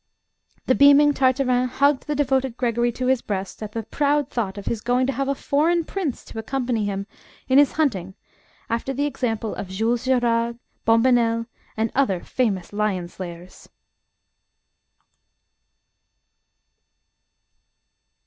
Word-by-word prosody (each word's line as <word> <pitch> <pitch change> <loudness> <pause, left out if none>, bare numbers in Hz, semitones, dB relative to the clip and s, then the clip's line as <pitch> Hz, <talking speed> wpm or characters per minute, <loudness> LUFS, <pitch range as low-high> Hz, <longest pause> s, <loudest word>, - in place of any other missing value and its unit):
The 255 - +3
beaming 285 +2 +6
Tartarin 255 -2 +2
hugged 280 +3 +1
the 295 - -1
devoted 265 -3 0
Gregory 240 -1 +1
to 255 - -3
his 260 -1 +2
breast 195 0 -5
at 210 -1 -6
the 225 - -3
proud 285 +5 0
thought 205 -5 -2
of 200 - -7
his 230 -2 -2
going 250 +2 +1
to 270 - -1
have 275 +2 -2
a 275 - 0
foreign 325 +5 +1
prince 345 -9 -4
to 225 - -8
accompany 240 -2 -1
him 200 -1 -3 0.4
in 265 +1 +5
his 290 -2 +4
hunting, 195 - -1 0.5
after 235 +4 -2
the 285 +3 -1
example 225 -6 -2
of 200 - -6
Jules 225 +5 -1
Gerard, 235 -2 +1 0.3
Bombonnel, 230 0 +3 0.3
and 220 0 0
other 215 -10 +1
famous 205 -8 -1
lion 200 -4 -1
slayers. 175 0 -10
245 Hz, 130 wpm, -23 LUFS, 220-270 Hz, 0.5 s, beaming